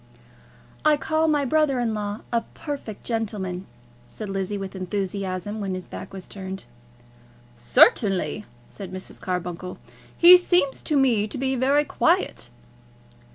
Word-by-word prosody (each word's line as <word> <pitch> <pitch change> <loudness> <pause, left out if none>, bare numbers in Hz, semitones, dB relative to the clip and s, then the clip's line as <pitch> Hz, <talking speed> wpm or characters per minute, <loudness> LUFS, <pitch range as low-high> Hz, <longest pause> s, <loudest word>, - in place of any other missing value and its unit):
"I 305 -1 +5
call 315 +2 +1
my 295 -2 +2
brother 285 -1 +2
in 235 -2 0
law 205 0 -4
a 235 -1 +2
perfect 280 -8 -6
gentleman," 200 -5 -3 0.4
said 210 - -8
Lizzie 195 +1 -2
with 195 0 -6
enthusiasm, 195 +1 -3
when 190 -2 -2
his 185 - -6
back - - -9
was 190 -2 -8
turned. 190 -5 -7 0.9
"Certainly," 200 - +3 0.2
said 195 +5 -9
Mrs. 185 0 -8
Carbuncle. 180 0 -4 0.4
"He 355 +1 +10
seems 355 -6 +1
to 300 - 0
me 235 -6 +3
to 215 - -6
be 265 +1 0
very 275 +4 +3
quiet." - - +1
210 Hz, 135 wpm, -24 LUFS, 190-270 Hz, 0.9 s, He